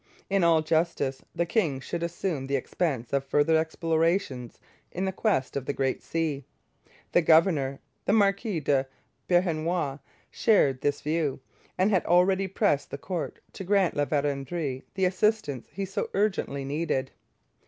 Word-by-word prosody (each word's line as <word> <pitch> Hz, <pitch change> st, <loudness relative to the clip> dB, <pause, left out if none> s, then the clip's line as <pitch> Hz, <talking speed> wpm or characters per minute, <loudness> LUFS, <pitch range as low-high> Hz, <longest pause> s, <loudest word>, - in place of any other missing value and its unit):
In 195 Hz, -2 st, +3 dB
all 165 Hz, -2 st, +4 dB
justice, 155 Hz, -4 st, 0 dB
the 170 Hz, -, +1 dB
king 170 Hz, -, 0 dB
should 170 Hz, +5 st, -5 dB
assume 170 Hz, -4 st, -2 dB
the 140 Hz, -, 0 dB
expense 135 Hz, -2 st, -2 dB
of 140 Hz, -1 st, +2 dB
further 145 Hz, +3 st, +2 dB
explorations 160 Hz, -, 0 dB, 0.3 s
in 190 Hz, +2 st, -1 dB
quest 185 Hz, -, 0 dB
of 135 Hz, -2 st, -3 dB
the -, -, 0 dB
Great 135 Hz, -1 st, -1 dB
Sea. 155 Hz, -4 st, -2 dB, 0.7 s
The 175 Hz, -, +4 dB
governor, 155 Hz, -5 st, +3 dB, 0.3 s
the 200 Hz, -, +2 dB
Marquis 200 Hz, -3 st, +2 dB
de 135 Hz, -2 st, +1 dB, 0.4 s
Beauharnois, 170 Hz, -4 st, +1 dB, 0.3 s
shared 140 Hz, -, +3 dB
this 145 Hz, 0 st, 0 dB
view, 150 Hz, -3 st, -1 dB, 0.4 s
and 190 Hz, +3 st, +3 dB
had 185 Hz, -4 st, +3 dB
already 190 Hz, +2 st, +4 dB
pressed 150 Hz, -6 st, +1 dB
the -, -, -5 dB
court 175 Hz, +3 st, -5 dB
to -, -, -7 dB
grant 195 Hz, -1 st, +2 dB
La 145 Hz, -, +1 dB
Vérendrye 140 Hz, -1 st, -2 dB
the 190 Hz, -1 st, +2 dB
assistance 185 Hz, -, 0 dB
he 195 Hz, -, -3 dB
so 190 Hz, -, -3 dB
urgently 190 Hz, -9 st, 0 dB
needed. 140 Hz, -2 st, -1 dB
160 Hz, 145 wpm, -27 LUFS, 140-185 Hz, 0.7 s, all